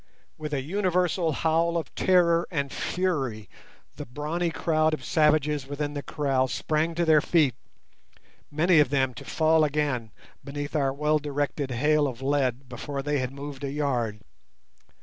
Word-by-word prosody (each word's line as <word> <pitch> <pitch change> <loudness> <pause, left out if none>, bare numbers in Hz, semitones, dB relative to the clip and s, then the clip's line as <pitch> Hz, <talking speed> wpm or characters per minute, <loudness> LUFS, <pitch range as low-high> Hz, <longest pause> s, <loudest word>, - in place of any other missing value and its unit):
With 150 -1 -6
an 135 -1 -3
universal 180 -2 +1
howl 165 +2 +1
of 160 -4 -5
terror 175 -2 +3
and 140 -5 -2
fury 135 - -2 0.5
the - - -6
brawny 155 +7 -2
crowd 155 -1 +1
of 130 - -12
savages 150 -3 +2
within 145 +1 -3
the 145 - -4
kraal 135 -3 0
sprang 155 +6 -1
to 170 0 +1
their 155 -2 +5
feet, 150 -7 +3 1.0
many 160 +3 +3
of 150 - +4
them 130 -2 +1
to - - -10
fall 160 0 +2
again 145 -6 -1 0.3
beneath 145 +2 -5
our 140 -3 +2
well 150 +2 +1
directed 145 -1 -2
hail 150 +4 +2
of 130 0 -6
lead 135 -2 0
before 135 +3 -5
they 145 0 0
had 130 0 -2
moved 140 0 -8
a 140 - -2
yard. 125 -8 -1
150 Hz, 155 wpm, -26 LUFS, 135-160 Hz, 1.0 s, their